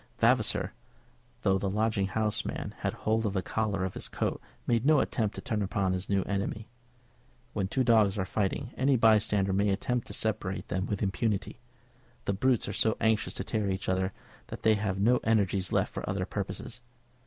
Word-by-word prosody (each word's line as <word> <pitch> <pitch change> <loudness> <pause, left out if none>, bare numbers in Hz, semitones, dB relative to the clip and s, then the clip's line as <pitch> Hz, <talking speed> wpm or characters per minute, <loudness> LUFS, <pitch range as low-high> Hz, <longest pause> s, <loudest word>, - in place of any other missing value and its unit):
Vavasor, - - +2 0.7
though 95 0 +3
the 100 - -1
lodging 105 -1 +1
house 105 +2 -1
man - - -4
had - - -1
hold 110 +1 0
of 105 -3 -1
the 95 -2 -1
collar 105 -4 -1
of 95 - -4
his - - -4
coat, - - -2 0.2
made 115 -1 +2
no 155 +2 +5
attempt 110 -6 0
to - - -6
turn 110 -6 -2
upon 95 -1 0
his 95 0 -3
new 100 -1 +2
enemy. 100 +2 -3 0.9
When 100 -3 -1
two 130 +7 +1
dogs 110 -4 +4
are 95 - 0
fighting, 105 +6 -1
any 135 +1 +3
bystander 105 -4 +3
may 100 +2 +2
attempt 120 +5 -1
to - - -7
separate 100 -3 -2
them 95 +1 -1
with 105 0 -2
impunity. 100 +1 -1 0.7
The 100 - +1
brutes 125 +4 +2
are 100 - -3
so 110 +3 +2
anxious 110 -1 +1
to - - -3
tear 105 -3 -1
each 95 0 -2
other 95 +1 +1 0.4
that - - -8
they 110 - +5
have 100 -3 -1
no 120 +5 +4
energies 100 -4 +1
left - - +1
for - - -4
other 95 -1 -1
purposes. 105 +5 -5
105 Hz, 190 wpm, -29 LUFS, 95-110 Hz, 0.9 s, no